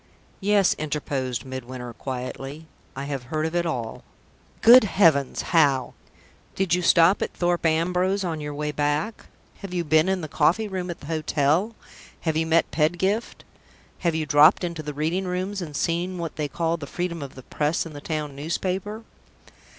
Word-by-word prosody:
"Yes," 200 -1 +3
interposed 140 -4 -3
Midwinter, 130 -2 -7
quietly; 135 +5 -6 0.3
"I 135 - -4
have 140 -2 -3
heard 155 +4 -2
of 160 +2 -3
it 175 -1 +1
all." 120 -8 -4 0.6
"Good 245 +2 +9
heavens! 165 -10 +3
how? 140 -6 +3 0.6
Did 190 -3 0
you 180 - +2
stop 170 +2 +5
at - - -2
Thorpe 175 -1 +1
Ambrose 180 +4 +1
on 165 -4 -3
your 145 0 -5
way 150 0 -2
back? 150 +8 -1 0.3
Have 190 -2 -7
you 175 - 0
been 155 +3 +3
in 190 -1 0
the 155 - -5
coffee 165 +8 +2
room 185 -2 -4
at 170 - -6
the - - -10
hotel? 155 +6 0 0.5
Have 160 -2 -1
you 160 +1 +1
met 165 +1 +2
Pedgift? 175 +8 0 0.6
Have 170 -3 0
you 160 -1 -1
dropped 150 +6 +6
into 170 -2 -3
the 150 -1 -6
Reading 165 +6 -1
Rooms, 185 +2 -3
and 155 -4 -6
seen 175 +3 -1
what 170 -2 -5
they 150 -1 -2
call 165 +2 -1
the 145 -3 -8
freedom 175 -1 -3
of 140 -2 -8
the 130 - -11
press 150 +6 -1
in 165 - -9
the 145 - -8
town 150 -3 -4
newspaper?" 185 +8 -3
160 Hz, 175 wpm, -24 LUFS, 145-180 Hz, 0.6 s, Good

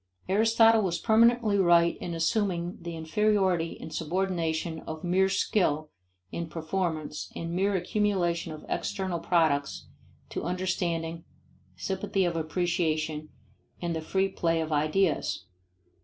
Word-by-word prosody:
Aristotle 225 +3 +5
was 180 -4 0
permanently 225 -2 +4
right 170 -2 +5
in 170 - -5
assuming 175 0 0
the 170 0 -6
inferiority 180 0 +1
and 160 - -8
subordination 165 -1 -1
of 160 0 -6
mere 185 +2 +3
skill 155 -6 +1 0.4
in 170 -1 -4
performance 160 -1 -3
and 165 0 -4
mere 195 +3 +1
accumulation 180 -3 0
of 155 - -9
external 190 -4 -2
products 155 -5 +1 0.4
to - - -4
understanding, 170 -2 -2 0.5
sympathy 190 0 -1
of 170 -1 -1
appreciation, 160 -2 -1 0.5
and 170 -1 -2
the 160 - -2
free 190 +4 +1
play 165 -3 0
of 160 -1 -3
ideas. 155 +3 +1
175 Hz, 120 wpm, -28 LUFS, 160-190 Hz, 0.5 s, Aristotle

